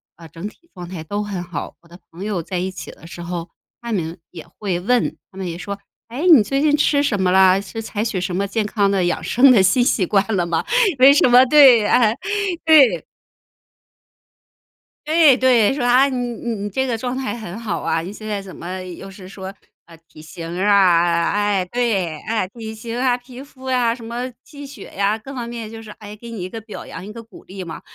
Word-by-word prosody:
啊， 165 -1 -13
整 165 +6 -7
体 340 +10 -16
状 175 -2 -9
态 175 -3 -7
都 205 +5 -3
很 195 -4 -5
好。 175 -4 -7
我 170 - -23
的 175 +2 -15
朋 175 +4 -9
友 205 -5 -2
在 180 0 -4
一 185 +1 -3
起 190 - -9
的 - - -16
时 175 -1 -9
候， 170 -1 -5 0.3
她 235 0 -6
们 170 -3 -3
也 165 -2 -11
会 190 -4 -2
问， 245 +6 0
她 190 - -16
们 190 -2 -4
也 170 0 -5
说： 200 +2 -6 0.3
“诶， 285 +10 -2
你 275 -10 +8
最 275 +6 -1
近 300 -1 +3
吃 285 -1 +2
什 205 -8 0
么 180 -1 +2
了？ 190 0 +5
是 225 +3 -7
采 220 0 -4
取 190 -5 -2
什 185 -1 -3
么 200 +1 -1
健 215 +2 -1
康 205 -2 +1
的 195 -2 +1
养 175 - -1
生 260 +2 +5
的 215 -6 +6
新 240 +7 +3
习 200 -6 +1
惯 195 +1 +2
了 175 -2 +1
吗？ 170 -1 -1 0.4
“为 270 +2 +8
什 285 - +4
么 250 +1 +7
对 260 -7 +7
啊， 225 -1 +3 0.5
对。 270 - +5 2.0
对 310 -4 +5
对， 250 -3 +4
说： 260 -4 -2
“啊， 255 +3 +4
你 260 - -3
你 240 -1 -4
你 205 - -3
这 265 +6 -1
个 235 -3 -2
状 250 +2 -4
态 260 -2 -3
很 205 -2 -8
好 230 -3 -3
啊， 165 - -1
你 180 +4 -7
现 215 +1 -10
在 205 -2 -3
怎 190 -2 -11
么 185 +2 -6
又 185 +2 -9
是 190 -1 -12
说， 190 -1 -8 0.4
啊， 165 -1 -15
体 155 - -14
型 170 +1 -8
啊 175 -4 +3
哎， 205 -2 +1
对， 195 -7 -1
哎， 220 -4 -1
体 220 0 -8
型 230 +2 -6
啊、 250 -1 +1
皮 250 +1 -12
肤 270 -2 -16
啊、 245 -3 +1
什 235 - -13
么 240 +3 -4
气 285 -2 -11
血 280 - -12
呀， 200 +2 +1
各 265 +5 -10
方 240 -2 -5
面 230 -2 -7
就 225 - -9
是， 215 -2 -11
诶， 210 0 -11
给 235 +2 -11
你 215 -6 -6
一 185 - -5
个 225 - -7
表 220 -1 -10
扬， 185 - -9
一 210 - -9
个 230 -1 -9
鼓 220 -3 -16
励 190 0 -8
嘛。 165 - -8
210 Hz, 245 characters per minute, -20 LUFS, 185-245 Hz, 2.0 s, 你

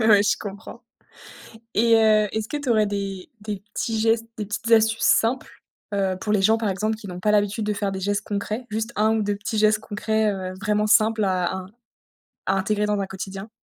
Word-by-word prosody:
Ouais, 215 -2 +6
je 205 - +2
comprends 205 +1 -9 0.9
et 230 +2 +4
heu, 215 -1 +4
est-ce 220 0 -2
que 295 - -3
tu 290 -3 -5
aurais 215 -2 +4
des 195 -2 -4
des 205 -2 -5
petits 225 -1 -1
gestes, 225 +1 +2
des 210 - -3
petites 220 +2 -4
astuces 225 0 +4
simples, 240 +3 +1 0.3
heu, 190 -2 0
pour 210 - -1
les 200 -2 +2
gens, 220 +3 +4
par 220 -2 -1
exemple, 215 +3 -1
qui 215 - -11
n'ont 180 0 -7
pas 210 - +1
l'habitude 210 +1 +1
de 210 - 0
faire 200 -1 -2
des 190 - -4
gestes 205 +2 -1
concrets, 215 +4 -3
juste 220 +2 -3
1 220 +1 +3
ou 220 - 0
2 205 0 -1
petits 210 +2 -4
gestes 215 0 +4
concrets, 220 0 -1
heu, 185 -1 -5
vraiment 210 0 +1
simples 220 -1 +4
à 185 -2 0
in 185 -1 -6 0.8
à 190 - +1
intégrer 210 +2 0
dans 210 -1 0
un 195 - -1
quotidien? 195 +2 -7
210 Hz, 215 wpm, -23 LUFS, 200-220 Hz, 0.9 s, Ouais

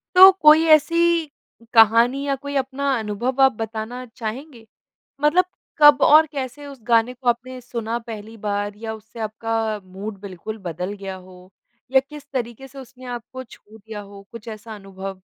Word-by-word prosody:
तो 380 +1 +11
कोई 310 +1 +7
ऐसी 335 +2 +1 0.5
कहानी 230 +5 +5
या 275 - +1
कोई 285 +1 -7
अपना 275 +1 -1
अनुभव 235 +5 -3
आप 265 -1 +6
बताना 225 +3 -5
चाहेंगे? 235 +1 -7 0.5
मतलब 320 +5 +4 0.3
कब 295 -1 +7
और 310 +1 +7
कैसे 275 +1 -6
उस 275 -2 -10
गाने 230 +2 +3
को 245 0 -4
अपने 250 +2 -1
सुना 235 -1 -4
पहली 220 0 -8
बार 205 0 -2
या 220 0 -6
उससे 220 +2 -12
आपका 220 0 -2
मूड 195 +2 -8
बिल्कुल 200 +3 -8
बदल 180 +4 -4
गया 195 -2 -7
हो 185 0 -15 0.4
या 265 - +6
किस 300 -2 -11
तरीके 250 +1 -4
से 275 +2 -14
उसने 255 0 -12
आपको 245 +2 -7
छू 220 -2 -17
दिया 215 0 -8
हो, 200 0 -12
कुछ 230 0 -10
ऐसा 220 0 -8
अनुभव? 195 -1 -8
230 Hz, 165 wpm, -22 LUFS, 210-270 Hz, 0.5 s, तो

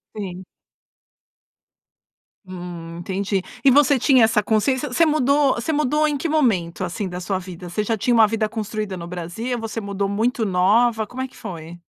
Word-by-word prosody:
Sim. 185 -3 -6 2.0
Hum. 175 -2 -8
Entendi. 195 +2 -2 0.2
E 270 - +6
você 280 -1 +5
tinha 260 -2 +5
essa 220 -1 +3
consciência, 255 +7 0
você 330 +6 +4
mudou 285 -3 +3
você 235 +7 -2
mudou 300 +1 +2
em 295 - -1
que 330 - -2
momento, 205 - +1
assim, 195 +2 -3
da 180 - -5
sua 185 +1 -2
vida? 180 -1 -9
Você 210 +5 -1
já 225 +1 -1
tinha 240 +4 +1
uma 225 -2 +6
vida 220 0 0
construída 215 -2 -4
no 170 -1 -7
Brasil, 180 +8 -4
você 225 0 -4
mudou 200 0 -2
muito 225 +3 0
nova, 215 +4 +3
como 255 +4 -7
é 260 - -2
que - - -22
foi? 170 -1 -8
215 Hz, 175 wpm, -22 LUFS, 185-250 Hz, 2.0 s, E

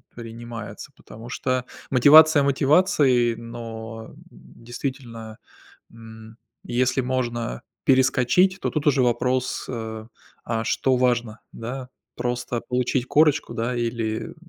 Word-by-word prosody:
принимается, 115 0 -8
потому 115 +2 -12
что 130 0 -1 0.3
мотивация 145 +3 +7
мотивацией, 140 -4 +3
но 115 -1 -8 0.2
действительно, 115 - -8 0.5
м, 110 0 -13 0.3
если 130 +2 0
можно 120 - -3 0.2
перескочить, 135 +8 +3
то - - -1
тут 150 -1 -2
уже 140 -2 +4
вопрос, 125 +1 0
э: 110 -2 -6 0.4
"А 115 -1 -2
что 130 +2 +1
важно?"- 120 -3 0
да? 125 +3 -7 0.3
Просто 120 -1 -3
получить 125 0 -1
корочку, 150 +1 +2
да, 115 +2 -2
или, 115 0 -2
м, 165 - -12
120 Hz, 110 wpm, -23 LUFS, 115-130 Hz, 0.5 s, мотивация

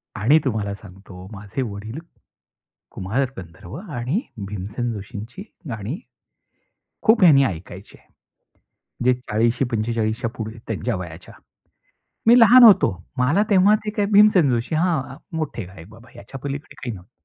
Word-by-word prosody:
आणि 120 +9 +4
तुम्हाला 105 -5 -1
सांगतो 95 -2 -13
माझे 105 +6 -5
वडील, 110 +2 -6 0.9
कुमार 110 +9 -2
गंधर्व 85 0 -11
आणि 150 - -3 0.3
भीमसेन 105 +5 -4
जोशींची 105 - -8 0.3
गाणी 115 - -5 1.1
खूप 220 -2 +4
हयानी 140 -5 +7
ऐकायचे. 95 +1 -7 1.1
जे 125 0 +4
40शी- 120 +1 0
45 110 0 -1
च्या 115 - -2
पुढे 110 0 -6
त्यांच्या 110 -4 -2
वयाच्या, 90 -1 -9 0.9
मी 235 +2 +7
लहान 245 +3 +8
होतो. 215 -4 +7 0.3
मला 145 +11 +3
तेव्हा 200 +1 +5
ते 210 - -2
काय, 210 -1 -1
भीमसेन 200 -8 +6
जोशी 120 +6 -1
हा 155 -5 -1 0.2
मोठे 155 -9 -4
गायक 90 -2 -13
बाबा, 115 +3 -16
ह्याच्यापलीकडे 140 +6 -8
काही 125 -3 -6
नव्हतं. 90 -1 -14
120 Hz, 130 wpm, -22 LUFS, 100-155 Hz, 1.1 s, लहान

